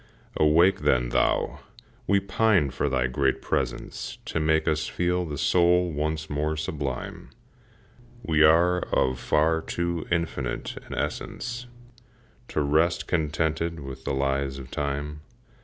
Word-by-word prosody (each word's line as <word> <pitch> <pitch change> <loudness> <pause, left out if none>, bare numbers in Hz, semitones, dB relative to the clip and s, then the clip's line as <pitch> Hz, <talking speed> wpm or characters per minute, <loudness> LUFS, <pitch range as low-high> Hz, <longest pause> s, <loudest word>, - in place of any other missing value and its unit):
Awake, 80 +5 +4
then, - - +2
thou! - - +1 0.5
we 100 -1 +4
pine 100 -6 +2
for - - -1
thy 65 -1 +1
great 65 +1 +1
presence 65 -3 -3
To - - -2
make 80 0 +2
us 80 0 +1
feel 90 0 0
the 75 -3 -5
soul 90 +2 +3
once 75 +1 -2
more 75 +1 -1
sublime, 70 -5 -4 0.9
We 80 -1 +2
are 85 +3 +5
of 65 -6 0
far 80 +3 +2
too 85 -1 -3
infinite 85 -7 -2
an - - -6
essence 120 0 -4 0.8
To 75 - -1
rest 80 +4 +2
contented 80 0 -1
with 65 -1 -8
the - - -2
lies 70 0 0
of 65 -1 -10
Time. 75 +1 -3
80 Hz, 130 wpm, -26 LUFS, 70-85 Hz, 0.9 s, are